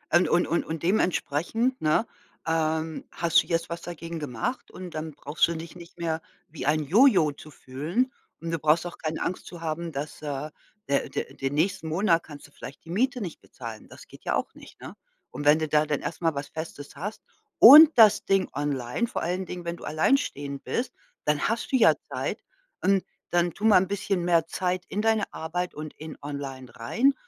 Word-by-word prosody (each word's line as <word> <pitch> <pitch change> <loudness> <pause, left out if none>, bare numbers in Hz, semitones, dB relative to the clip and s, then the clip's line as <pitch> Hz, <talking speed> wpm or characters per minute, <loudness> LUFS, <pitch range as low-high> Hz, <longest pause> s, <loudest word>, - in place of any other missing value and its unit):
Und 175 -2 +4
und 175 - +3
und 170 - +1
und 160 -1 -5
dementsprechend, 190 - 0
ne, 155 +8 +2 0.4
ähm, 160 0 0
hast 170 +1 +3
du - - -12
jetzt 165 -1 -1
was 170 0 -5
dagegen 170 -1 -6
gemacht 145 - -4
und 180 -1 -9
dann 155 0 -5
brauchst 145 +3 +1
du 170 - -3
dich 165 +1 -8
nicht 175 0 -13
mehr 165 -1 -2 0.3
wie 150 -3 -6
ein 155 +1 +2
Jojo 185 - +5
zu 145 +2 -13
fühlen 155 - -2 0.3
und 165 0 -5
du 165 - -1
brauchst 155 +3 +3
auch 175 - -7
keine 160 0 -3
Angst 185 - -4
zu 175 -2 -10
haben, 165 +1 -3
dass, 145 +1 -6
äh, 150 0 -4 0.4
der 140 0 0
der - - -4
den 135 +1 -3
nächsten 165 +1 0
Monat 165 +1 +2
kannst 145 -2 -11
du - - -25
vielleicht 135 -1 -11
die 165 - -9
Miete 250 +6 0
nicht 175 -6 -6
bezahlen. 115 -3 -9
Das - - -13
geht - - -15
ja - - 0
auch - - -2
nicht, - - -15
ne, - - -9 0.4
und 145 - -6
wenn 150 +1 +7
du 160 -1 -1
da 150 0 +2
dann 150 -2 -1
erst 165 - -5
mal 165 -3 +1
was 140 +1 -4
Festes 155 -3 -8
hast 205 +9 -6 0.3
und 295 +7 +11
das 215 -2 +7
Ding 195 -1 +2
online, 140 - -1
vor 245 - -4
allen 180 +2 -2
Dingen, 180 -1 -7
wenn 170 0 -3
du - - -13
alleinstehend 145 - 0
bist, 245 +2 -2 0.3
dann 150 -1 +1
hast 230 +1 -2
du - - +3
ja 235 -3 +6 0.2
Zeit - - -3 0.4
und 195 0 +3 0.3
dann 175 0 +2
tu 215 - -5
mal 210 -4 +7
'n 190 - -2
bisschen 200 -2 -1
mehr 170 -2 +3
Zeit 180 +1 -2
in 210 - -1
deine 220 -1 +1
Arbeit 175 +3 -3
und 155 0 -8
in 155 0 -8
online 140 -3 -6
rein 240 - +2
165 Hz, 205 wpm, -26 LUFS, 150-185 Hz, 0.4 s, und